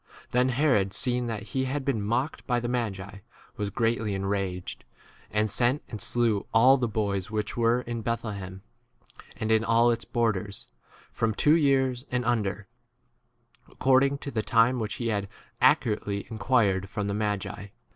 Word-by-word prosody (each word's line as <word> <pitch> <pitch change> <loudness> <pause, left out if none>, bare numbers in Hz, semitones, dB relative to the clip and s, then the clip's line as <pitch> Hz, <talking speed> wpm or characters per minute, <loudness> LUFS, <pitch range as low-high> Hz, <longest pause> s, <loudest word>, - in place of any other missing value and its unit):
Then 125 +1 +3
Herod, 120 -8 +2
seeing 125 +1 0
that 110 -3 -4
he 130 0 0
had 135 +1 -3
been 130 -6 0
mocked 120 +8 -2
by 120 -2 +1
the 120 - -3
magi, 100 -5 -3 0.4
was 105 -1 -3
greatly 115 -1 0
enraged; 95 -2 -3 0.5
and 105 0 +1
sent 120 +7 +1
and 110 -4 -6
slew 115 -4 0
all 130 +4 +7
the 120 - 0
boys 100 -4 -2
which 110 -1 -3
[were] 120 +1 +2
in 120 -1 -5
Bethlehem, 100 -5 -4 0.7
and 110 -1 -2
in 110 0 +4
all 115 +1 +4
its 115 -1 -2
bor 115 +3 +1
ders, 100 0 -7 0.4
from 110 -2 -1
two 150 - +4
years 135 -4 +1
and 125 -1 -1
under, 105 -4 -1 1.0
ac - - -21
cording 135 +1 +3
to 140 - -7
the 110 - -1
time 115 +3 +3
which 110 -2 -3
he 120 -1 -2
had 100 -2 -1 0.3
accurately 105 -2 +2
inquired 105 -4 +1
1 - - -12
from 105 +1 -3
the 100 - -1
ma 105 0 0
17 100 - -4 0.3
gi. - - -24
115 Hz, 175 wpm, -27 LUFS, 100-125 Hz, 1.0 s, all